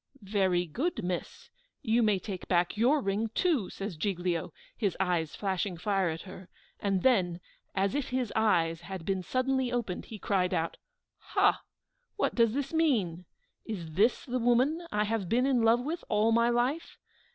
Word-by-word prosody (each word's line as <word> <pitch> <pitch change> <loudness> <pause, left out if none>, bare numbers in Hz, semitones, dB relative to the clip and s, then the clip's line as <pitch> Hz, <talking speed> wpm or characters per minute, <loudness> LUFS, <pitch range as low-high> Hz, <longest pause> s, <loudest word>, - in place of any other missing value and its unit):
"Very 190 -3 +1
good, 260 - -2
miss! 180 0 -5 0.3
You 235 -1 +3
may 210 -3 +3
take 190 -1 -6
back 175 +1 +2
your 255 +7 +3
ring, 210 +1 -1
too!" 310 - +1
says 195 -2 -5
Giglio, 175 -1 -1 0.2
his 200 -6 -1
eyes 175 -4 0
flashing 190 -2 -2
fire 195 +1 +1
at 160 0 -5
her; 185 -1 -11 0.3
and 195 -3 0
then, 180 -9 +3 0.4
as 195 0 +1
if 285 -2 -2
his 255 -3 -2
eyes 165 -7 +2
had 180 -1 -7
been 190 -1 0
suddenly 255 +5 0
opened, 235 -7 -2
he 220 - -8
cried 190 -3 0
out, 165 +1 -2 0.4
"Ha! - - +2 0.5
what - - 0
does 230 -1 +3
this 280 +1 -2
mean? 210 - +1 0.4
Is 175 -8 -6
this 210 +9 +2
the 255 -1 -2
woman 255 +8 +2
I 210 0 +1
have 210 -4 -2
been 245 +3 +3
in 265 -3 +2
love 230 +2 +4
with 320 +6 -4
all 215 +1 +3
my 235 +1 +4
life? 245 +7 -1
210 Hz, 170 wpm, -30 LUFS, 180-245 Hz, 0.5 s, love